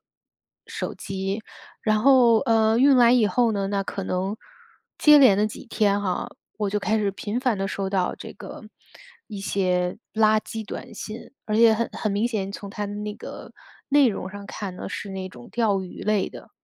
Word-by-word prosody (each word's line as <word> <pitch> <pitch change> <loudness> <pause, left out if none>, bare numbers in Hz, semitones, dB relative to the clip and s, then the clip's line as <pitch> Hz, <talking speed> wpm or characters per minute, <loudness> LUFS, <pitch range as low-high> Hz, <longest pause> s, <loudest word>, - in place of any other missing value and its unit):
机。 - - -63 1.8
然 215 -1 +2
后， 245 -1 +6
呃， 225 -2 +3
运 275 0 +6
来 240 -1 +6
以 240 -4 +4
后 235 +4 +2
呢， 200 -2 -1
那 200 0 -1
可 195 0 -5
能 190 +3 -2 0.6
接 300 -1 +7
连 250 -8 +7
的 210 - +2
几 215 +4 -6
天 205 -3 +1
哈， 185 -3 -2 0.3
我 205 -2 -1
就 210 - 0
开 215 +2 0
始 205 -2 +1
频 210 +5 -4
繁 245 -6 0
地 195 - -1
收 195 -1 -3
到 185 -2 0
这 - - -9
个， 205 - -10 0.6
一 205 -3 -7
些 180 -2 0 0.2
垃 215 0 +4
圾 220 0 -7
短 215 - -8
信， 220 +5 -8
而 215 0 -1
且 225 -1 +6
很 230 +1 -1
很 215 -2 -2
明 210 +4 +1
显， 200 -4 -3
从 200 -1 -8
它 210 0 -4
的 205 - -6
那 210 0 -4
个 - - -9 0.4
内 285 -1 +5
容 190 -3 -4
上 200 0 -9
看 190 -3 -6
呢， - - -6
是 200 - -6
那 190 -1 -5
种 120 -8 -13
钓 210 -5 +1
鱼 180 - -9
类 210 -2 +1
的。 - - -12
210 Hz, 210 characters per minute, -24 LUFS, 195-225 Hz, 1.8 s, 接